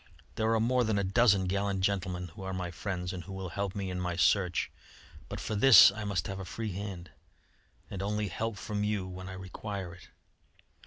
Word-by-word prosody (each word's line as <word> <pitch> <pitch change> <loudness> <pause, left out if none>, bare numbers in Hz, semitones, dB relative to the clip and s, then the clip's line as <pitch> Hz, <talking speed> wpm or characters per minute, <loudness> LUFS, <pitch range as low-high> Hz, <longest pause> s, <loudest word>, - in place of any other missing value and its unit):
There 110 0 0
are - - +2
more 125 +3 +2
than 110 -2 +1
a 100 - +1
dozen 100 -1 +4
gallant 100 +1 -1
gentlemen, 90 -2 -1
who 80 - -12
are 95 0 -4
my 90 -1 -3
friends, 90 0 -4
and 90 -2 -6
who 95 - -9
will 95 -1 -5
help 100 +2 -3
me 95 -2 -3
in 90 - -3
my 90 -1 -2
search. 90 0 +2 0.6
But - - -5
for - - -4
this 105 -1 +9
I 105 +1 -6
must 95 -5 -1
have 95 0 -5
a - - -5
free 110 +4 -4
hand, 95 -2 -6 0.8
and 95 - -6
only 105 +1 -1
help 110 +4 -3
from 105 0 -3
you 105 -3 -1
when 95 0 -8
I - - -6
require 95 0 -6
it. 90 - -15
95 Hz, 210 wpm, -30 LUFS, 90-105 Hz, 0.8 s, this